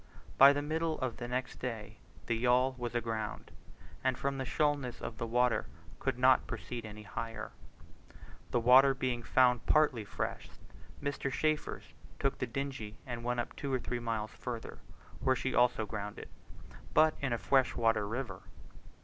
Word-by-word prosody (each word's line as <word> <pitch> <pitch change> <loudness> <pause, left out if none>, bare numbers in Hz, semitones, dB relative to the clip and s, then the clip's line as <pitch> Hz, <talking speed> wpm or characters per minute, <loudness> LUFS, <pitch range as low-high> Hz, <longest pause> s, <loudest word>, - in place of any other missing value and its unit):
By 140 +1 +11
the 145 0 -1
middle 160 +1 -1
of 130 -4 -2
the 120 - -5
next 125 +1 -3
day 110 -4 -5 0.3
the 115 - 0
yawl 125 +3 +3
was 120 -1 -4
aground, 110 -2 -3 0.5
and 130 -1 +1
from 140 0 -2
the 130 - -2
shoalness 145 -3 0
of 110 - -6
the 115 - -2
water 125 +1 +2 0.3
could 135 -2 -1
not 130 0 +5
proceed 120 -3 -5
any 105 0 -9
higher. 110 +2 -5 1.0
The 120 - +2
water 130 +3 +7
being 125 -2 -1
found 125 0 +3
partly 150 -7 +3
fresh, 100 - -4 0.5
Mr. 140 -1 -2
Chaffers 155 +2 -1 0.2
took 135 - -1
the 125 - -1
dingey 125 -4 -4
and 120 -2 -5
went 120 0 0
up - - -8
two 140 - -4
or 130 - +1
three 120 0 -3
miles 115 -2 -2
further, 120 -2 -6 0.4
where 130 - +2
she 130 +1 -2
also 120 -2 +3
grounded, 105 -1 -6 0.7
but 155 0 +6
in 140 -2 -1
a 120 - +1
fresh 130 +2 +2
water 115 -3 +2
river. 110 -4 -4
125 Hz, 165 wpm, -32 LUFS, 115-135 Hz, 1.0 s, By